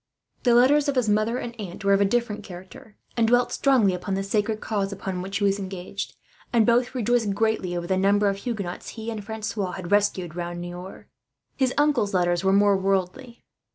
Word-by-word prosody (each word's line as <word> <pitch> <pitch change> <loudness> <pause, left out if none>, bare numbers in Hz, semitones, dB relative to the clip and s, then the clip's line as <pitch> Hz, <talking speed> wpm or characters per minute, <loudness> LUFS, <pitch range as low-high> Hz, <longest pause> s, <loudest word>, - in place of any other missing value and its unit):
The 240 -2 +4
letters 280 +4 +5
of 280 - -1
his 250 -3 +1
mother 215 +3 +1
and 240 -1 -5
aunt 195 0 -7
were 200 - +4
of 195 - +3
a - - +5
different 225 0 -1
character, 185 +3 -12 0.2
and 230 -1 +2
dwelt 245 +1 +3
strongly 250 -9 +3
upon 185 +2 -3
the 195 - -2
sacred 210 +2 -1
cause 200 -3 -2
upon 190 -2 -4
which 195 +2 -3
he 205 - -2
was 200 0 +2
engaged; 190 0 -6 0.4
and 230 -3 +4
both 245 +3 +2
rejoiced 235 -4 +1
greatly 210 -5 0
over 170 - -4
the 190 +1 0
number 200 +2 +3
of 195 0 0
Huguenots 200 -5 -5
he 225 +1 -4
and 215 -2 -5
Francois 210 -3 -4
had 185 -1 -7
rescued, 195 -5 +1
round 175 0 -4
Niort. 175 +2 -8 0.5
His 260 -2 +1
uncle's 275 -9 +2
letters 175 0 +1
were 190 - +3
more 200 0 +4
worldly. 195 +6 -2
205 Hz, 200 wpm, -25 LUFS, 190-230 Hz, 0.5 s, letters